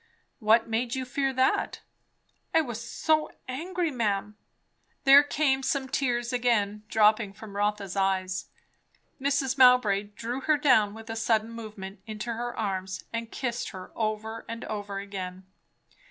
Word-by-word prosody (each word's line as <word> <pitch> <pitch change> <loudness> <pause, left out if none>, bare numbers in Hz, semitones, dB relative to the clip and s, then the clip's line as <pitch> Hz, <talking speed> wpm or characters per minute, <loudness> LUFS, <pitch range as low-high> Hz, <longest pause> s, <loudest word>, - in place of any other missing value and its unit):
"What 225 0 +4
made 230 +3 -1
you 260 -1 -2
fear 270 +1 0
that?" 260 0 +1 0.7
"I 325 - +7
was 240 -6 -5
so 310 +6 +1 0.2
angry, 335 +6 -2
ma'am." 210 -4 -1 0.7
There 275 +1 +9
came 285 -2 +1
some 270 0 -1
tears 245 -2 -1
again, 215 -4 +1
dropping 215 -1 +3
from 205 0 -11
Rotha's 205 -2 -1
eyes. 190 -1 0 0.7
Mrs. 275 -1 0
Mowbray 250 -6 +6
drew 240 +3 -4
her 305 +2 +3
down 235 -8 +4
with 225 0 -8
a - - -4
sudden 225 0 +1
movement, 215 -4 -8
into 215 +2 -4
her 240 +1 -4
arms, 190 -3 -3
and 230 0 -3
kissed 240 -2 -3
her 185 -2 -9
over 220 0 -2
and 230 0 -5
over 205 -2 -4
again. 190 -2 -6
230 Hz, 140 wpm, -28 LUFS, 205-260 Hz, 0.7 s, There